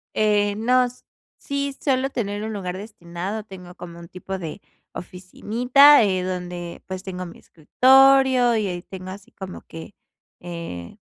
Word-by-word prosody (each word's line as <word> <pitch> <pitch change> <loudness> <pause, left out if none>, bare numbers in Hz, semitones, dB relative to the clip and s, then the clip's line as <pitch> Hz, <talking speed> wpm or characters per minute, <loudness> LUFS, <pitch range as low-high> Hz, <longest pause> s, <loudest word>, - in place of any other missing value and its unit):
Eh, 205 -1 +2
no, 250 +3 +3
s 250 0 -8 0.3
sí, 280 -1 -3
suelo 270 -1 0
tener 205 -5 -3
un 220 - -4
lugar 185 -3 -4
destinado, 195 0 -6
tengo 180 -3 -12
como 170 -2 -10
un 170 - -11
tipo 190 +2 -6
de 165 -4 -7 0.3
oficinita, 240 +10 +4
eh, 185 -2 0
donde, 180 -2 -5
pues, 185 -1 -6
tengo 185 -1 -6
mi 170 - -12
escritorio, 260 - +4
y 215 -2 0
ahí 175 -1 -4
tengo 185 0 -9
así 195 +1 -11
como 190 -1 -9
que, 165 +4 -11 0.5
eh, 170 - -8
195 Hz, 150 wpm, -23 LUFS, 180-240 Hz, 0.5 s, oficinita